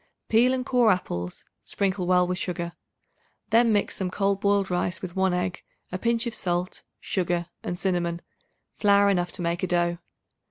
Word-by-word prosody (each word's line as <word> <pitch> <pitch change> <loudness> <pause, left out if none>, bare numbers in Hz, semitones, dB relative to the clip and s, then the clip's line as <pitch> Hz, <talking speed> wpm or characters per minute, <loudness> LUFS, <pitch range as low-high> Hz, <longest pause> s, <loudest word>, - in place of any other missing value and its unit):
Peel 235 +3 +5
and 255 -1 -1
core 245 -4 +4
apples; 90 - -3 0.2
sprinkle 190 -2 -1
well 180 0 +4
with 180 +1 -2
sugar. 170 -1 -3 0.8
Then 230 +1 +5
mix 205 -1 +1
some 190 -2 -2
cold 195 +1 0
boiled 200 -2 +2
rice 180 0 -1
with 180 -1 -7
1 190 -1 +2
egg, 180 0 -2 0.3
a 185 - -3
pinch 235 +2 +1
of 235 - -3
salt, 175 0 -2 0.2
sugar 175 -2 -1
and 175 - -4
cinnamon, 175 -2 -1 0.6
flour 200 -1 +5
enough 175 -2 0
to 175 - -4
make 170 +1 -1
a 185 - 0
dough. 175 -1 +1
185 Hz, 170 wpm, -26 LUFS, 175-200 Hz, 0.8 s, Peel